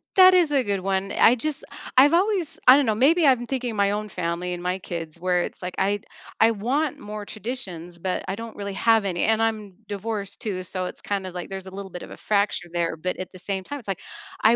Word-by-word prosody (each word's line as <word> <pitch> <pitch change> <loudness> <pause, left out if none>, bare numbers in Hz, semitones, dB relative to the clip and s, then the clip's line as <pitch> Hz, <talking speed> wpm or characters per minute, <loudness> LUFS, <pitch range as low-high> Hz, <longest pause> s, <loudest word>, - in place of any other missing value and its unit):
that 370 -1 +9
is 345 -5 +4
a 270 -2 +3
good 200 -2 0
one, 195 +1 -1
I 240 - +5
just 300 +4 -2 0.3
I've 285 +5 +7
always 370 -3 +1
I 260 +2 +10
don't 285 - +3
know, 215 -1 +1
maybe 310 +7 +4
I'm 245 -2 +4
thinking 250 -4 -2
my 200 0 +2
own 210 +1 -2
family 180 0 -2
and 175 0 -6
my 180 +1 -1
kids 165 -2 -6
where 180 0 +2
it's - - -7
like, 180 0 -5
I 200 +1 +1 0.4
I 225 +1 +6
want 255 +8 -1
more 210 0 -7
traditions, 190 -8 -6
but 185 +1 -2
I 190 - -2
don't 230 0 -8
really 200 -1 -5
have 225 +1 +3
any, 175 -3 -1
and 220 0 +3
I'm 215 -4 -1
divorced 205 0 -4
too, 185 -4 -3
so 185 0 -3
it's - - -7
kind 195 -2 -2
of 180 - -8
like 180 +1 -6
there's 190 -1 -6
a - - -8
little 195 -2 -7
bit 180 - -7
of - - -10
a - - -9
fracture 200 -4 0
there, 170 -2 -1
but 180 +3 -3
at 185 -1 -6
the 185 - -10
same 190 +1 -3
time, 285 +5 -6
it's 220 - -13
like, 195 - -3 0.4
I 225 +2 +6
200 Hz, 245 wpm, -24 LUFS, 185-235 Hz, 0.4 s, I